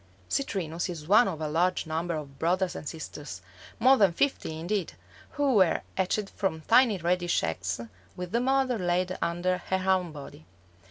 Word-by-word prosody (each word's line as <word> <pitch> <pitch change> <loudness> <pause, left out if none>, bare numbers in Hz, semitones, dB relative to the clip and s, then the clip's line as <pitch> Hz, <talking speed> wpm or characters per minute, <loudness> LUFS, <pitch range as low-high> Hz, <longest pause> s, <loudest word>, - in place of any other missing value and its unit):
Citrinus 175 - -2
is 160 -4 -7
one 215 +6 +6
of 170 -5 -4
a 155 - -1
large 175 +5 +1
number 165 +2 -2
of 140 -3 -8
brothers 180 +3 +1
and 150 - -5
sisters, 155 -2 -8 0.3
more 260 +3 +5
than 200 -5 +5
fifty 165 - -1
indeed, 185 +3 -2 0.4
who 285 -2 +1
were 190 -6 +4
hatched 195 +2 -1
from 185 -6 -2
tiny 230 +3 +4
reddish 175 0 0
eggs 90 +5 -2 0.4
which 180 -1 -6
the 235 +2 +1
mother 260 -2 +1
laid 180 +1 0
under 175 +2 0
her 190 +1 0
own 180 -3 +1
body. 140 - -11
180 Hz, 165 wpm, -28 LUFS, 160-200 Hz, 0.4 s, one